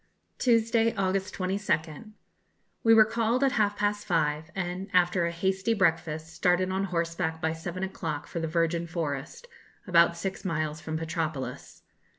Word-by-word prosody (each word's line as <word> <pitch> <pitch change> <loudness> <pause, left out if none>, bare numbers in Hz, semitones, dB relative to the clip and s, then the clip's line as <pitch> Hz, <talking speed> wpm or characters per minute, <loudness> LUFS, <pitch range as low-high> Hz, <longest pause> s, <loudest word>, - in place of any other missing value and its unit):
Tuesday, 230 -1 +3
August 190 0 -1
22nd. 185 0 -2 0.7
We 225 - +5
were 220 -1 +8
called 230 +3 0
at 270 - +4
half 210 -5 +1
past 205 0 -1
five, 155 -3 +1
and, 185 +1 -3
after 175 -1 +3
a - - -2
hasty 190 +5 0
breakfast, 165 -4 0
started 180 +3 +2
on 190 +1 0
horseback 170 -2 -2
by 160 -1 0
seven 170 +3 -5
o'clock 165 -6 -4
for 170 - -5
the 165 - -2
Virgin 165 +1 0
Forest, 160 - -4 0.4
about 170 -3 +4
six 190 +3 -4
miles 155 -4 -2
from 160 0 -3
Petropolis. 160 -4 -4
175 Hz, 150 wpm, -28 LUFS, 160-195 Hz, 0.7 s, were